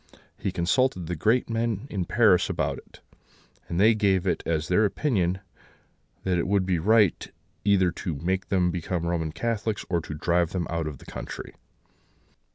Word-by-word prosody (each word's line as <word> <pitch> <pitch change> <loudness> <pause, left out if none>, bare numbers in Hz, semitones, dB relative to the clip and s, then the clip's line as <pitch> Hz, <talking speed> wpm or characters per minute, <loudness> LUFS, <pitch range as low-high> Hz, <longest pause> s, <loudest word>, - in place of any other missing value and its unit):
He 95 - -3
consulted 90 +2 +1
the 90 +2 -3
great 110 +10 +2
men 115 -1 -1
in 95 -3 -2
Paris 105 -3 +4
about - - -1
it; - - -18 0.7
and 85 - -1
they 110 +3 +6
gave 100 -4 +2
it - - 0
as 80 -1 0
their 90 +4 +3
opinion 95 - 0 0.8
that 90 -2 +1
it 85 - -1
would 100 -1 +2
be 90 -3 +1
right 105 +1 +3 0.3
either 95 -3 +3
to 85 -2 -4
make 95 +6 -2
them 90 -2 +2
become 85 0 -3
Roman 85 -2 -1
Catholics, 110 +4 -2
or 85 - +2
drive 85 +2 -1
them 90 -3 -1
out 85 -2 -1
of 75 -3 -6
the - - -16
country. - - -7
90 Hz, 165 wpm, -26 LUFS, 85-105 Hz, 0.8 s, they